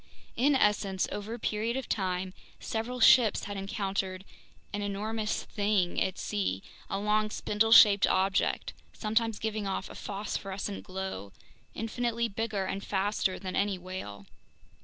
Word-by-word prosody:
In 275 +4 +3
essence, 205 -5 +2
over 210 +3 -4
a - - -7
period 225 +2 -1
of 265 - -4
time 185 -2 -1 0.3
several 235 +3 -3
ships 230 -2 +6
had 205 - -5
encountered 195 -1 -3 0.5
"an 205 - -2
enormous 210 +2 -2
thing" 200 -4 0
at 190 0 0
sea, 95 -1 -2 0.3
a 195 - -1
long 210 +1 +1
spindle 215 +1 0
shaped 205 -3 +8
object, 195 +1 +1 0.2
sometimes 220 0 0
giving 215 -2 -2
off 195 0 -3
a - - -8
phosphorescent 195 0 -4
glow, 185 - -5 0.4
infinitely 235 +1 -1
bigger 215 -2 -2
and 195 +1 -3
faster 195 -1 0
than 185 -1 -5
any 200 -1 +1
whale. 175 - -7
205 Hz, 140 wpm, -30 LUFS, 190-220 Hz, 0.5 s, shaped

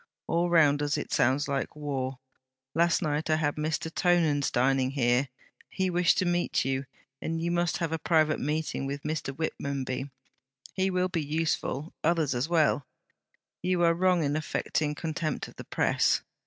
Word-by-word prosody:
All 170 +1 +1
round 150 -4 +4
us 145 0 0
it - - -4
sounds 135 +4 +2
like 140 0 -2
war. 135 -3 -3 0.6
Last 170 +1 +2
night 150 +1 -1
I 155 - +4
had 150 -2 0
Mr. 155 +1 -2
Tonans 165 -6 +2
dining 130 +1 +2
here; 130 0 +1 0.4
he 190 -1 -1
wished 175 0 +3
to 185 - +2
meet 175 -5 +1
you; 135 0 -1 0.4
and 165 0 -2
you 170 +1 -1
must 175 0 +1
have 165 -2 -2
a 160 - -1
private 155 -1 +2
meeting 150 -1 -2
with 140 +1 -5
Mr. 150 -2 -2
Whitmonby: 135 -3 -3 0.6
he 190 0 +1
will 185 0 +1
be 170 -3 -1
useful; 155 0 -2
others 160 -4 +2
as 125 +6 -1
well. 155 -5 +2 0.7
You 180 -1 +1
are 170 0 +5
wrong 180 -1 +2
in 145 0 0
affecting 155 -1 -1
contempt 155 -1 -3
of - - -16
the - - -8
Press. - - +2
155 Hz, 170 wpm, -28 LUFS, 140-170 Hz, 0.7 s, are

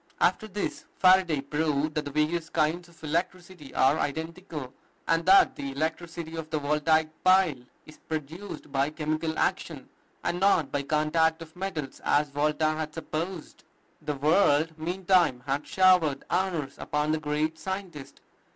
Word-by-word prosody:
After 215 - +2
this, 205 0 -4
Faraday 185 -5 +4
proved 150 +1 -1
that 150 -1 -2
the - - -4
various 155 +3 0
kinds 165 +2 0
of 165 -1 -21
electricity 175 0 -3
are 140 +4 +3
identical; 160 -2 -4 0.3
and 165 0 +2
that 195 +1 +6
the 140 -1 -5
electricity 160 +3 -4
of 160 -1 -6
the 155 - -1
Voltaic 150 +2 +2
pile 185 -9 +4 0.2
is 155 - -15
produced 160 +4 -6
by 135 +1 +1
chemical 155 +1 -2
action, - - -1 0.4
and 175 - -1
not 190 -7 +3
by 145 - 0
contact 160 +3 +1
of 160 +1 -17
metals, 180 -7 -5
as 145 -1 +2
Volta 150 +2 0
had 155 -1 -4
supposed. 165 +2 -5 0.4
The 150 -1 -3
world 155 +1 +3
meantime 175 -5 +1
had 140 +1 -2
showered 180 -7 +3
honors 175 -6 -1
upon 150 +1 -1
the 155 - 0
great 155 +2 -1
scientist. 185 -7 -6
155 Hz, 145 wpm, -27 LUFS, 150-175 Hz, 0.4 s, that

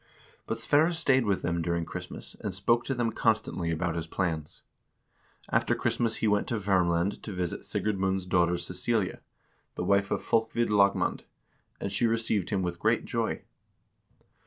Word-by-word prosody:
But 115 - -2
Sverre 150 +8 +3
stayed 135 -6 +3
with 100 -2 +1
them 85 0 0
during 85 0 -1
Christmas, - - -7
and 100 -3 -4
spoke 115 +5 +2
to 135 - -1
them 120 -2 0
constantly 110 -7 0
about 85 +1 -1
his 85 -1 -4
plans. 80 -4 -3 0.9
After - - +2
Christmas 115 -2 0
he 110 - 0
went 105 -1 +2
to 115 - -1
Vermland 95 -2 +1
to 110 - -6
visit 90 -2 -3
Sigurd 105 -2 -2
Mund's 95 -1 0
daughter 90 -1 +2
Cecilia, 95 +4 -1 0.6
the - - -3
wife 100 0 +2
of - - -1
Folkvid 115 0 +1
Lagmand, 100 -1 +2 0.5
and 100 - -3
she 120 - +2
received 110 -4 0
him 95 -2 0
with 85 -1 -3
great - - +2
joy. - - -2
100 Hz, 160 wpm, -29 LUFS, 85-115 Hz, 0.9 s, Sverre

